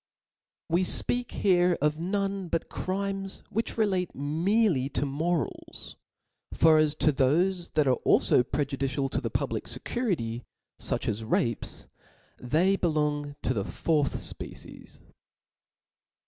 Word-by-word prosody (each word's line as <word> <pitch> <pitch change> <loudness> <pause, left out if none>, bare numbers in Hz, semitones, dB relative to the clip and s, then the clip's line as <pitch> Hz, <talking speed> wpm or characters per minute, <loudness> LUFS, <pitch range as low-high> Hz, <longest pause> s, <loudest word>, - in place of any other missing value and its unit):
We 170 +1 +2
fpeak 245 +6 +2
here 180 -2 +2
of 150 +2 +1
none 195 +1 -2
but 165 0 -2
crimes 195 +1 -3
wMch 225 +3 -2
relate 190 -5 0
merely 160 - +1
to 140 0 -1
morak, 155 +4 -3 0.6
for 160 -1 +6
as 155 -1 +3
to 150 -1 +2
thofe 170 +7 +1
that 150 -2 +3
are 130 -2 +2
alfo 125 - +4
pre 145 +1 +1
judicial 135 0 -2
to - - -1
the - - -2
public - - -2
fccurity^ 150 - -2 0.4
fuch - - -1
as 110 +1 -1
rapes, 115 +1 -2 0.5
they 170 +10 +2
Wong 150 -3 0
to 130 - +1
the 105 -5 -1
fourth 150 +6 0
fpecie^. - - -9
160 Hz, 125 wpm, -28 LUFS, 140-190 Hz, 0.6 s, for